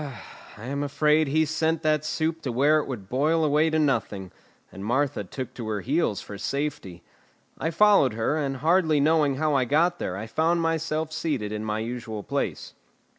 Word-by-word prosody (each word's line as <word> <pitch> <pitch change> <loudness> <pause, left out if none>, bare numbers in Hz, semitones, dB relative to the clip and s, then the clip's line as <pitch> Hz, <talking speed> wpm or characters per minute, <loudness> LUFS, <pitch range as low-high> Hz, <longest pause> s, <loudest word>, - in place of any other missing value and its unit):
I 110 - -9
am 140 +2 -3
afraid 150 +2 +2
he 155 +3 +2
sent 160 +1 -1
that 155 -1 +2
soup 160 +1 -2
to 135 - -3
where 145 +6 +3
it 150 - -4
would 110 -8 -6
boil 155 +7 +1
away 150 +2 +3
to 160 - 0
nothing, 110 - -1 0.4
and 95 - -9
Martha 130 +2 0
took 130 +6 -7
to 115 -3 -7
her 105 -2 -2
heels 135 - 0
for 100 -1 -9
safety. 140 - -4 0.6
I 160 - -1
followed 170 - +4
her, 115 +7 0
and 140 -3 -2
hardly 160 +1 +3
knowing 150 -1 +3
how 155 +2 0
I 135 -2 +2
got 170 +7 +2
there 90 - -3
I 105 - -5
found 160 +8 +1
myself 160 -1 -1
seated 145 -10 -2
in 105 0 -4
my 105 0 -2
usual 115 -2 -5
place. - - -3
145 Hz, 185 wpm, -25 LUFS, 115-160 Hz, 0.6 s, followed